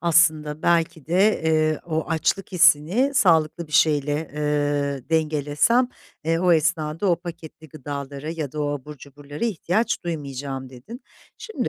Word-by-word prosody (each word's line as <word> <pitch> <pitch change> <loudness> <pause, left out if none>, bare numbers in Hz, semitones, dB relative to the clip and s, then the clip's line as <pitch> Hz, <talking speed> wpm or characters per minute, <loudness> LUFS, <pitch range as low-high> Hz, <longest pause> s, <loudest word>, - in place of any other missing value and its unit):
Aslında, 155 -2 +2
belki 165 -3 +1
de, 190 +3 +2
eee, 155 -1 +2
o 160 -1 -1
açlık 165 +5 -1
hissini 180 - +3
sağlıklı 170 - +2
bir 155 - -16
şeyle, 150 0 +2
eee, 145 -2 -1
dengelesem, 155 - +2 0.4
eee, 165 +1 +1
o 180 0 +3
esnada 160 +2 0
o 170 - +3
paketli 165 -2 -10
gıdalara 140 +1 -6
ya 155 -5 -5
da 155 - -4
o 145 - -1
abur 145 +1 -6
cuburlara 145 - -8
ihtiyaç 215 0 -1
duymayacağım, 140 -5 -5
dedin. 135 - -11 0.4
Şimdi 445 - -4
155 Hz, 140 wpm, -23 LUFS, 145-170 Hz, 0.4 s, hissini